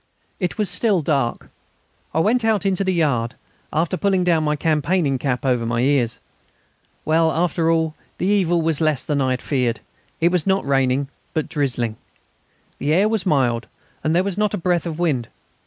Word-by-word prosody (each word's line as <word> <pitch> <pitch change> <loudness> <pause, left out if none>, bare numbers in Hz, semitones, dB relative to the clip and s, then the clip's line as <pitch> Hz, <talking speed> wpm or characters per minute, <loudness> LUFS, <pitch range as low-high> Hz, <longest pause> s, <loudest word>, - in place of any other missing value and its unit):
It 180 -1 -2
was 210 -2 +1
still 185 +1 +1
dark. 140 -5 -1 0.6
I - - 0
went 230 +6 +2
out 220 -3 +1
into 195 0 +1
the 190 - +1
yard, 135 -9 0 0.4
after 165 +4 0
pulling 190 -2 +1
down 170 -3 +2
my 150 0 +1
campaigning 150 -1 +1
cap 135 0 -2
over 125 -3 +2
my 115 +1 0
ears. 130 -3 +1 0.9
Well, 160 +1 +3
after 165 0 +1
all, 160 -1 +1 0.2
the - - -2
evil 180 -4 +2
was 160 -1 0
less 155 -4 +1
than 145 -2 0
I 130 - +1
had 130 0 -2
feared. 125 -5 0 0.4
It 170 +1 +3
was 180 -2 0
not 195 0 +2
raining, 135 0 +1 0.3
but 155 - 0
drizzling. 120 -6 -1 0.8
The 150 +2 +1
air 195 +4 +4
was 215 -4 -1
mild, 125 -7 +1 0.4
and 155 +1 +1
there 180 - +3
was 200 0 -3
not 210 -1 +1
a - - -3
breath 175 -1 0
of 160 -2 -4
wind. 145 -9 0
160 Hz, 185 wpm, -21 LUFS, 135-180 Hz, 0.9 s, air